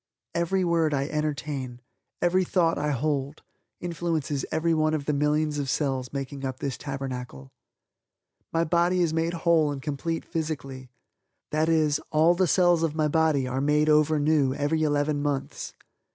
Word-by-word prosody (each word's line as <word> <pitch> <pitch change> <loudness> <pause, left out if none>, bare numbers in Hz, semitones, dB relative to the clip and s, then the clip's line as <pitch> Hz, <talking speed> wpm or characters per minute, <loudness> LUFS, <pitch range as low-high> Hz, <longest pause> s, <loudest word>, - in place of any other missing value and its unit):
Every 170 +3 0
word 165 -3 +2
I 140 0 -1
entertain, 145 -4 -3 0.4
every 185 +2 +3
thought 170 -2 +1
I 150 - 0
hold, 145 +1 -2 0.4
influences 165 -5 -2
everyone 155 -1 +1
of 145 -2 -4
the 150 - 0
millions 150 +1 +1
of 140 -2 -2
cells 135 -3 -1
making 140 0 -5
up 130 -1 -3
this 135 -1 -3
Tabernacle. 125 - -6 1.0
My 165 0 +2
body 175 +2 +2
is 160 -2 0
made 165 +1 0
whole 165 -3 +3
and 140 - -4
complete 150 +4 -3
physically. 140 -6 -5 0.6
That 155 +1 +1
is, 155 -3 +2
all 160 +3 +5
the 180 +1 +1
cells 175 0 +4
of 160 -2 0
my 155 -1 +1
body 155 -4 +2
are 130 +1 -2
made 150 +2 +2
over 155 0 +4
new 145 -3 +2
every 150 +2 0
eleven 145 -1 +1
months. 145 -2 -3
150 Hz, 155 wpm, -26 LUFS, 140-165 Hz, 1.0 s, all